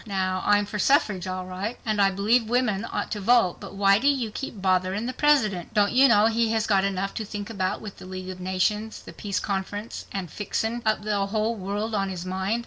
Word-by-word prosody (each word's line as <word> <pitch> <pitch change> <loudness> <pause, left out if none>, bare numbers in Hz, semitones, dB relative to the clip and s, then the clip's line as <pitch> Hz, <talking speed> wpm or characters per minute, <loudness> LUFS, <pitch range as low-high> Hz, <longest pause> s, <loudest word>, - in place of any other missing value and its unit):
Now, 185 -2 -1
I'm 205 0 +4
for 210 +1 -5
suffrage 205 - +2
alright, 185 +4 -4
and 215 -2 +1
I 195 - +5
believe 215 +4 +2
women 230 -4 +1
ought - - -3
to 210 - -2
vote, 225 -3 +3
but - - -9
why 200 0 +4
do 270 - +1
you 260 -6 +1
keep 230 -2 -6
botherin' 185 +3 +1
the 255 - -3
President? 225 - +1
Don't 205 -1 +3
you 270 +2 +6
know 210 -4 +5
he 225 0 +2
has 220 -1 +1
got 195 -3 +3
enough 195 0 -1
to 220 - -3
think 205 +1 -6
about 185 -3 -2
with 210 -2 -9
the - - -11
League 185 0 -6
of 185 - -9
Nations, 210 +4 -1
the - - -11
Peace 205 -1 -3
Conference 205 +2 -4
and 185 -5 -5
fixin' 220 +4 -2
up 215 -1 +1
the 205 -2 0
whole 215 +2 0
world 205 +2 -3
on 195 -2 0
his 180 -1 -5
mind?" 190 +5 -1
205 Hz, 225 wpm, -25 LUFS, 190-225 Hz, -, you